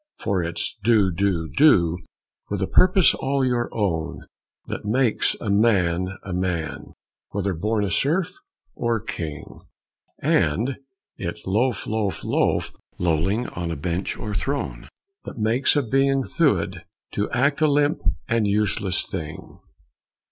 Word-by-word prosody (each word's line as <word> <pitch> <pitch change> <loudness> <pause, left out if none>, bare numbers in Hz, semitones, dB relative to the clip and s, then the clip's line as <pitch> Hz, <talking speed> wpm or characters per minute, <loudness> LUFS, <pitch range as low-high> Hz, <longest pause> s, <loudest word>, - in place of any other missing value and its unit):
For 95 -2 0
it's 85 +5 -3
do, 105 -4 +4
do, 90 -2 0
do, 90 - +5 0.5
with 100 - -2
a 95 - +1
purpose 180 - +5
all 135 0 0
your 120 -1 0
own, 85 -7 -2 0.4
That - - -5
makes 115 +2 +1
a 105 - -2
man 95 -4 +2
a 95 - -5
man, 90 -4 -3 0.4
whether 100 -1 -1
born 105 +5 0
a 100 - -1
serf 160 - +1 0.4
or 115 -1 0
king; 80 -8 -6 0.6
And 115 - +1 0.4
it's - - -5
loaf, 115 +6 0
loaf, 110 -3 -2
loaf, - - 0 0.2
lolling 90 +8 +1
on 85 -1 -4
a 85 - -2
bench 85 +6 -3
or 105 -1 -5
throne 135 +9 -3 0.4
That - - -8
makes 115 +7 +2
a 145 - +2
being 135 +2 +2
thewed - - 0 0.3
to 105 - -1
act 140 +5 +1
a 155 - +5
limp 145 +1 +2 0.3
and 115 -2 +1
useless 100 -2 +1
thing! 80 -5 -7
105 Hz, 135 wpm, -23 LUFS, 90-125 Hz, 0.6 s, do